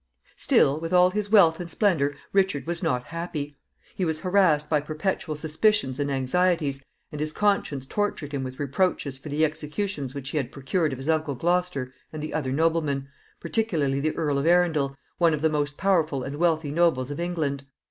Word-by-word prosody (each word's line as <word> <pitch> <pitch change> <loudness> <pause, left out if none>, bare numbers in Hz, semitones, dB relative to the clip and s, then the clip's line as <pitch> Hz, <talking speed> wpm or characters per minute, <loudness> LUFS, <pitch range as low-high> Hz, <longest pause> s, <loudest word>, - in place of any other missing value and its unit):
Still, 140 +3 +3
with 165 +2 -4
all 180 0 +6
his 205 +1 -2
wealth 170 -7 +6
and 175 -1 -6
splendor, 155 -7 +1 0.2
Richard 190 -7 +2
was 170 0 -3
not 125 -1 0
happy. 155 -4 -5 0.3
He 190 - -3
was 160 -2 -1
harassed 180 -6 +3
by 150 -2 +2
perpetual 155 +1 -2
suspicions 160 -1 +1
and 145 0 0
anxieties, 140 +1 +1 0.3
and 150 - -5
his 155 0 -1
conscience 195 -9 0
tortured 170 -3 -2
him 140 -2 -3
with 130 0 -6
reproaches 145 -1 -1
for 150 - -9
the 150 +2 +2
executions 150 -2 -3
which 135 -1 -5
he - - -2
had 135 -3 -2
procured 150 +4 -1
of 130 - -4
his 135 +3 -7
uncle 155 -3 +1
Gloucester 170 -4 -1 0.2
and 155 -1 -6
the 155 - -5
other 140 -5 -1
noblemen, 150 -2 0 0.3
particularly 160 -7 0
the 155 +2 -1
Earl 145 -4 0
of 140 - -1
Arundel, 160 -6 +3 0.2
one 165 -3 +4
of 145 - -6
the 160 0 +2
most 145 -1 -1
powerful 160 -8 +1
and 140 +2 -5
wealthy 160 -3 +1
nobles 150 -5 +2
of 145 - -5
England. 155 -6 -2
155 Hz, 190 wpm, -25 LUFS, 140-175 Hz, 0.3 s, all